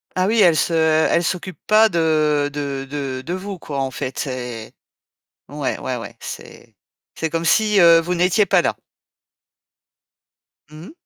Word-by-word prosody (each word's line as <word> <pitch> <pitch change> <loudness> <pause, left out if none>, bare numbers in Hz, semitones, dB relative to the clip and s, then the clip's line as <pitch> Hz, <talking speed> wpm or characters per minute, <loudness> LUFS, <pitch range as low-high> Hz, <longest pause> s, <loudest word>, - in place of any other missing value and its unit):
Ah 185 0 +1
oui, 220 +2 +2
elles 175 -5 +5
se 170 - 0
elles 160 +1 +2
s'occupent 185 +1 -4
pas 215 +1 +5
de 155 -5 +1
de 140 -2 -4
de 135 -3 -4
de 170 - -5
vous 190 +1 -5
quoi 140 -4 -5
en 135 - -2
fait, 130 +2 -5
et 125 -4 -6 0.8
ouais, 145 -1 -3
ouais, 130 - -3
ouais, 115 -4 -9
c'est - - -10 0.4
c'est 160 -1 -3
comme 165 0 -2
si, 210 +3 +3
heu, 170 -1 +7
vous 175 +2 -3
n'étiez 180 +4 +2
pas - - +3
là. - - -1 1.9
Mmh. 155 - -12
160 Hz, 155 wpm, -20 LUFS, 140-180 Hz, 1.9 s, heu